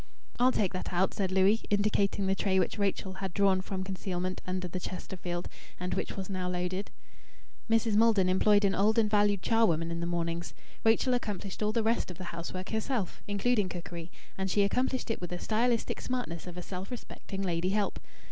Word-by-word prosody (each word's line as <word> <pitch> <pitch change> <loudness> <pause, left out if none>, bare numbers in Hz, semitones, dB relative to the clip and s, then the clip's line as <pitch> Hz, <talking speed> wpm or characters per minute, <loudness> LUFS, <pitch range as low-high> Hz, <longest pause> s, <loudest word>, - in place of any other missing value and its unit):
"I'll 250 +1 +6
take 200 -7 +1
that 185 - -3
out," 180 +1 +2
said 190 -2 -1
Louis, 195 +4 +4
indicating 205 -1 +2
the 190 - +3
tray 195 -1 +1
which 190 +3 +1
Rachel 195 -1 0
had 190 -3 -4
drawn 195 -2 +4
from 190 0 -4
concealment 185 -1 -3
under 185 0 -2
the 180 +1 -4
Chesterfield, 175 -1 -5 0.3
and 180 +1 -2
which - - -3
was 190 - -3
now 185 -2 -2
loaded. 180 +2 -2 0.8
Mrs. 225 -1 +3
Maldon 215 -4 +5
employed 205 +2 +4
an 195 - +3
old 210 +4 +3
and 225 -2 +5
valued 205 -2 +3
charwoman 170 -8 +3
in 170 - -2
the 170 - -2
mornings. 170 0 -2 0.3
Rachel 230 +3 +4
accomplished 205 -5 -3
all 210 0 +2
the 225 0 +1
rest 225 -2 +1
of 180 - -7
the 185 - -6
housework 180 +2 -5
herself, 220 -3 -2
including 205 0 +1
cookery, 170 -1 -6 0.3
and 190 0 0
she 205 +2 +3
accomplished 250 +4 0
it 225 - -3
with 175 - -4
the 180 - -3
stylistic 230 +4 0
smartness 245 -10 -3
of 180 0 -7
a 180 - -5
self 185 +1 -6
respecting 200 -5 -6
lady 175 0 0
help. 205 +1 0
195 Hz, 195 wpm, -30 LUFS, 180-215 Hz, 0.8 s, I'll